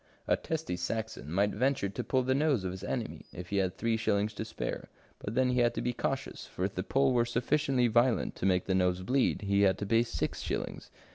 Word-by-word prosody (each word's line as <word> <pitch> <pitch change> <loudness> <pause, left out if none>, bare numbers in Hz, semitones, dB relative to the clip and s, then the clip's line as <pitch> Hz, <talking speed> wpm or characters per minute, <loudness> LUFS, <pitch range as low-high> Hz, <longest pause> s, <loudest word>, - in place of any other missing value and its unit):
A - - +4
testy 160 - -3
Saxon 110 -7 -4
might 100 +4 +2
venture 130 -1 +1
to 100 - -4
pull 130 -1 +1
the 130 +1 +2
nose 140 -6 +2
of 95 - -2
his 95 +1 -8
enemy - - -4
if 90 0 -8
he 100 - -1
had 95 -2 0
three 115 -1 +1
shillings 105 -1 0
to 110 - -4
spare, 110 - -5 0.3
but 105 - -5
then 130 0 +3
he 125 - +1
had 120 -1 +3
to - - -1
be 125 - 0
cautious, 135 +3 -3
for 90 - -3
if 100 - -3
the 90 - -2
pull 135 +6 +2
were 120 -1 +4
sufficientiy 125 +2 +1
violent 120 +1 +2
to 95 - 0
make 90 -1 +2
the 95 - 0
nose 90 -1 +1
bleed, 130 0 +1
he 100 0 +2
had 95 -2 +4
to 100 - -3
pay 115 +2 +4
six 115 -1 -2
shillings. - - -4
115 Hz, 235 wpm, -31 LUFS, 95-130 Hz, 0.3 s, A